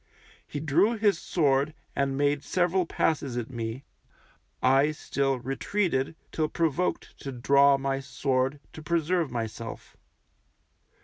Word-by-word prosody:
He 145 - -5
drew 170 +10 +2
his 210 -2 +2
sword 145 -2 +1 0.2
and 140 -1 0
made 145 0 +1
several 180 0 +1
passes 140 -8 0
at 120 +1 -4
me, 115 +2 -4 0.8
I 135 +3 +4
still 135 -2 -1
retreated 135 +3 -1 0.2
till 155 -1 0
provoked 165 +2 -1
to 135 - -5
draw 140 +2 +4
my 135 0 -1
sword 135 0 -1
to 155 - -9
preserve 165 0 0
myself. 115 -2 -6
140 Hz, 120 wpm, -27 LUFS, 135-160 Hz, 0.8 s, I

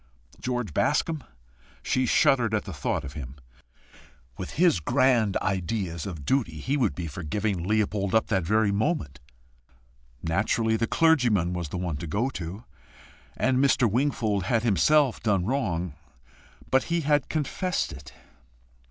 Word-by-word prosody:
George 125 -8 -3
Bascombe? 160 - 0 0.6
she 130 -1 +1
shuddered 120 -3 +3
at 105 - -1
the 95 - -7
thought 70 - -2
of 70 - -7
him. 70 -3 -7 1.0
With 90 - -6
his 170 - +3
grand 120 - +2
ideas 95 -3 -2
of 80 -7 -7
duty, 85 - 0
he 135 - -1
would 125 -9 +1
be 90 - -4
for 80 +3 -6
giving 100 +3 -2
up 85 - -5
Leopold 105 -2 0 0.2
that 95 -5 0
very 110 +4 +2
moment! 100 - -1 1.0
Naturally 110 +6 +1
the 115 +1 0
clergyman 120 - +3
was 85 -4 -4
the 90 - -4
one 90 -4 -3
to 85 - -6
go 115 - -1
to 95 +2 -6 0.7
and 130 0 +2
Mr. 130 -3 +4
Wingfold 110 -4 0
had 115 +2 +1
himself 130 +5 +3
done 100 -5 +1
wrong. 95 - -1 0.8
But 130 0 +3
he 170 0 0
had 145 -2 +1
confessed 170 +4 -1
it! 70 0 -11
105 Hz, 145 wpm, -26 LUFS, 90-130 Hz, 1.0 s, Mr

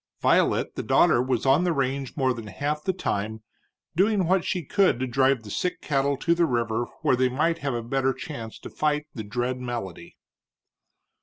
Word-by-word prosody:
Violet, - - +2
the - - -4
daughter, 120 - +4
was 125 -1 -1
on 135 +6 +4
the 180 - +2
range 135 -1 -2
more 130 -2 +2
than 115 -2 -8
half 150 +8 -3
the 190 - +1
time, 110 - -3 0.5
doing 195 +1 +3
what 185 +1 +2
she 180 -5 -2
could 185 -6 +2
to 130 - 0
drive 130 0 +2
the 105 - -9
sick 180 - -2
cattle 140 -1 0
to 170 +4 +2
the 170 -1 +2
river 120 -2 0 0.2
where - - +4
they 130 +1 +2
might 165 +6 0
have 140 -4 -2
a 120 - -3
better 135 +2 +1
chance 125 -7 -7
to - - -10
fight 150 0 0
the 115 - -5
dread 125 +4 -2
malady. 105 -9 -6
135 Hz, 190 wpm, -25 LUFS, 120-155 Hz, 0.5 s, daughter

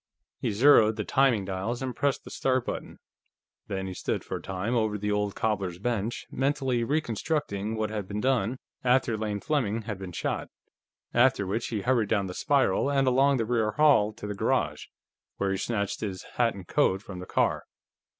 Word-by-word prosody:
He - - -1
zeroed 110 -1 +5
the 105 - -2
timing 130 -7 +3
dials 100 +7 -3
and 130 -2 -3
pressed 140 -1 0
the - - -11
start 130 -2 0
button. - - -5 0.7
Then 95 -1 -3
he 95 - -5
stood - - -2
for - - -4
a - - -10
time 95 +5 -3
over 110 -2 +1
the 105 +1 -2
old 105 -1 0
cobbler's 100 -5 -1
bench, 115 +2 -2
mentally 135 -3 0
reconstructing 115 -5 -1
what 110 -1 -2
had 105 -3 -4
been 105 +1 -3
done 125 -1 +1 0.3
after 125 -2 +3
Lane 105 -1 -2
Fleming 115 -8 0
had 105 -3 -5
been 95 -2 -6
shot, 85 - -2 0.7
after 120 -4 +4
which 110 +5 -2
he 110 -3 -2
hurried 120 -3 +1
down 100 -3 +1
the 90 - -5
spiral 140 +4 +2
and 135 -1 +2
along 135 +2 +4
the 115 - 0
rear 110 -2 +1
hall 145 -9 +4
to - - -9
the 105 - -3
garage, 100 - 0 0.5
where 100 -1 0
he 95 - 0
snatched 100 -3 -2
his 95 -4 -4
hat 120 -2 +2
and 95 -3 -10
coat 95 +2 +2
from 95 -3 -8
the 90 - -8
car. - - +1
110 Hz, 190 wpm, -28 LUFS, 100-130 Hz, 0.7 s, zeroed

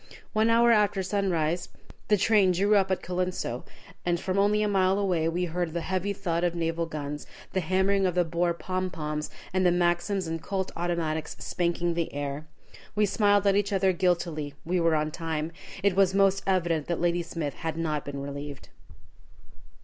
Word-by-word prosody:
One 220 +1 +3
hour 235 +1 +5
after 205 -3 +3
sunrise 180 -4 0 0.4
the 210 - +4
train 200 -2 +4
drew 200 +4 +3
up 195 -2 +3
at 190 - -1
Colenso, 180 -9 -2 0.4
and 175 -1 +1
from 190 +2 -1
only 210 +1 +3
a - - +2
mile 190 -1 +2
away 180 -5 +1
we 175 +2 -1
heard 175 -1 -2
the 170 - -2
heavy 190 +3 -1
thud 175 -4 -2
of 175 -1 +1
the - - -6
naval 165 0 -1
guns, 150 -2 -5 0.3
the 190 - +1
hammering 190 +2 +2
of 180 - -2
the 180 - +4
Boer 170 +1 0
"pom 185 +1 -2
poms," 150 -2 -4 0.2
and 185 0 +2
the 180 - +5
Maxims 175 +2 +1
and 165 0 -3
Colt 190 0 -3
automatics 165 -2 -2
spanking 175 -1 -1
the 170 -1 -2
air. 145 +1 -4 0.5
We 210 0 +4
smiled 205 0 +3
at 200 -1 +4
each 205 0 +1
other 190 -1 +3
guiltily. 170 -5 0
We 180 +2 +1
were 165 -1 +3
on 155 0 0
time. 160 0 -3 0.3
It 200 -2 +3
was 195 -1 +3
most 195 0 +4
evident 170 -5 +1
that 170 - -1
Ladysmith 170 -3 -1
had 160 -1 -4
not 155 -3 -1
been 140 -1 -5
relieved. 140 0 -7
175 Hz, 185 wpm, -27 LUFS, 165-195 Hz, 0.5 s, hour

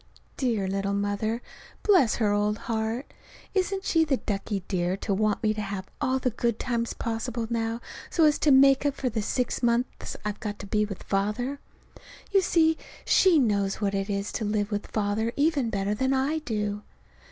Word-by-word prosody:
Dear 230 -7 0
little 195 +1 -1
Mother! 205 +3 -1 0.4
Bless 360 - +5
her 215 -3 +1
old 210 +1 +1
heart! 225 +3 -3 0.4
Isn't 385 0 0
she 325 -1 +3
the 290 -4 +1
ducky 200 -3 -3
dear 180 0 0
to 200 0 -2
want 210 +2 +1
me 215 -1 +3
to 215 - -4
have 195 -2 -4 0.2
all 265 -2 +2
the 255 -1 0
good 235 0 0
times 235 -2 -1
possible 230 +1 -3
now 230 0 -1 0.3
so 330 - +2
as 300 -1 +3
to 305 - +3
make 275 0 +6
up 285 -1 +1
for 255 - -1
the 220 -1 -2
six 250 +4 -1
months 240 +1 0
I've 210 -1 -3
got 210 -1 -4
to - - -8
be 210 +1 +1
with 200 -3 -7
Father? 210 +8 -1 0.7
You 395 -1 +5
see, 320 -3 +3 0.3
she 370 -4 +5
knows 200 -7 +2
what 200 -2 0
it 195 +1 -1
is 200 0 -2
to 225 - -3
live 210 0 -1
with 205 0 -2
Father 215 +2 -1
even 285 -5 +2
better 200 -1 -1
than 260 +5 +1
I 280 +4 +1
do. 210 -6 -2
225 Hz, 185 wpm, -27 LUFS, 205-265 Hz, 0.7 s, make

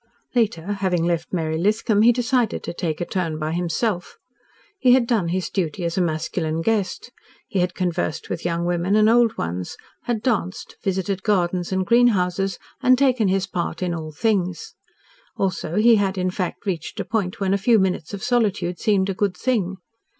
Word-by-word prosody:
Later, 215 -9 +1 0.2
having 180 -3 +1
left 170 -1 -1
Mary 160 -3 -1
Lithcom, 210 +2 +2
he 235 - +7
decided 245 -1 0
to - - -4
take 170 -2 -3
a - - 0
turn 170 -5 -2
by 155 0 -2
himself. 175 - -2 0.6
He 250 -2 +5
had 255 -2 +4
done 225 -7 +1
his 180 +2 -1
duty 175 -2 -2
as 170 - -2
a 185 - +1
masculine 160 0 -1
guest. 220 +2 -1 0.4
He 195 - -1
had 180 0 0
conversed 175 -3 -2
with - - -4
young 170 0 -1
women 175 +3 +1
and 215 0 +5
old 235 0 +4
ones, 90 +2 -4 0.3
had 230 -3 -2
danced, 205 -7 -2
visited 190 0 -1
gardens 180 -3 0
and 190 0 0
greenhouses, 195 -5 +2 0.2
and 255 -1 +5
taken 255 -5 +3
his 190 0 +1
part 180 -1 -3
in 175 -1 -1
all 160 -2 -5
things. 200 - -1 0.6
Also 185 -3 -2
he 225 +1 +6
had, 195 -1 0
in 185 0 0
fact, 185 +2 -4
reached 175 -6 -3
a - - -2
point 200 -5 -2
when 195 -1 +1
a - - +3
few 225 +3 +4
minutes 185 -5 0
of 200 -1 -6
solitude 205 -7 0
seemed 195 -3 +2
a 195 - -1
good 190 -1 -1
thing. 200 -6 0
190 Hz, 185 wpm, -22 LUFS, 175-215 Hz, 0.6 s, he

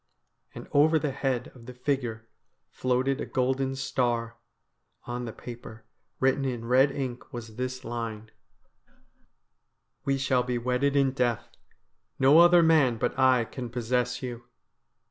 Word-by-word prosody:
And - - -9
over 155 +3 +4
the 150 -2 -1
head 130 -2 -2
of 120 -2 -15
the 125 - -9
figure 125 -4 -2 0.4
floated 130 +2 0
a - - -4
golden 130 +1 0
star. 120 -4 -1 0.7
On 120 0 -5
the 115 - -5
paper 115 -1 -10 0.3
written 135 +1 +2
in 120 -3 -3
red 130 +4 +4
ink 130 -3 -5
was 115 -4 -8
this 130 +1 -4
line: 115 -2 -5 0.8
' - - -46
We 135 0 0
shall 135 -2 +1
be 125 0 -2
wedded 125 +4 0
in 135 -1 +3
death. 120 -4 -1 0.7
No 140 +4 +6
other 175 0 +7
man 150 -8 +4
but 125 +3 -2
I 130 -3 +4
can 125 +1 -7
possess 125 +1 -1
you.' 120 -2 -6
125 Hz, 145 wpm, -27 LUFS, 120-135 Hz, 0.8 s, other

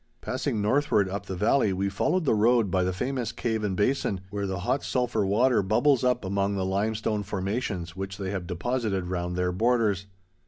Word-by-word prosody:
Passing 105 -2 -2
northward 105 -3 +2
up 100 +2 -5
the 95 - -4
valley, 105 +3 +2
we 95 +1 -1
followed 155 - 0
the - - +3
road 110 -1 +3
by 95 -1 +2
the 90 - 0
famous 125 +4 -2
Cave 110 -2 -2
and 95 -3 -1
Basin, 105 -4 0
where 100 -1 -2
the 95 -2 -3
hot 135 +9 0
sulphur 120 -5 0
water 120 +4 +3
bubbles 120 +7 +2
up 125 -3 +1
among 100 +1 0
the 95 -1 -1
limestone 105 +2 -1
formations 95 -3 -3
which 95 0 -5
they 95 -1 -3
have 95 -3 -4
deposited 100 +1 -1
round 90 -1 -3
their 90 0 0
borders. 110 -1 +1
100 Hz, 190 wpm, -27 LUFS, 95-120 Hz, -, the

